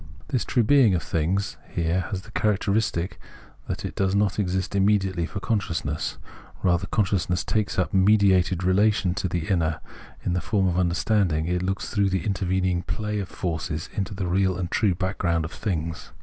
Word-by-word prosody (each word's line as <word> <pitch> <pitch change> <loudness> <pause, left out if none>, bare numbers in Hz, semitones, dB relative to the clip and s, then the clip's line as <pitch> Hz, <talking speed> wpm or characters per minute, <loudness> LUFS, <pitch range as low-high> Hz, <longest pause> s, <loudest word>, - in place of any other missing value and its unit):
This 125 - 0
true 120 - +2
being 120 -5 +5
of 85 - -1
things 90 +5 -1
has - - -21
here 85 +2 0
the 95 +2 -5
characteristic 105 -3 0 0.5
that - - -4
it - - -4
does 95 0 0
not 100 -1 +1
exist 95 0 -1
immediately 95 -3 +2
for 100 - -5
consciousness; 85 -9 -2 0.5
rather, 90 +1 +2
consciousness 90 -5 0
takes 105 -2 -1
up 90 - 0
a - - 0
mediated 95 -2 +4
relation 95 0 +3
to 95 - -2
the 85 -2 -2
inner; 80 -4 +1 0.5
in 90 - +1
the 90 - 0
form 100 -3 +1
of 90 0 +1
understanding 90 -2 +1
it 90 +1 0
looks 95 +1 -2
through 100 -2 +2
the 95 -3 -1
intervening 95 -2 0
play 105 +2 -3
of 95 - -4
forces 80 -3 -3
into 100 +1 -3
the 95 - -2
real 95 +1 +1
and 90 -1 -3
true 100 -5 +2
backgromid 90 -3 0
of 80 - -6
things. 85 -5 -4
95 Hz, 180 wpm, -25 LUFS, 85-100 Hz, 0.5 s, being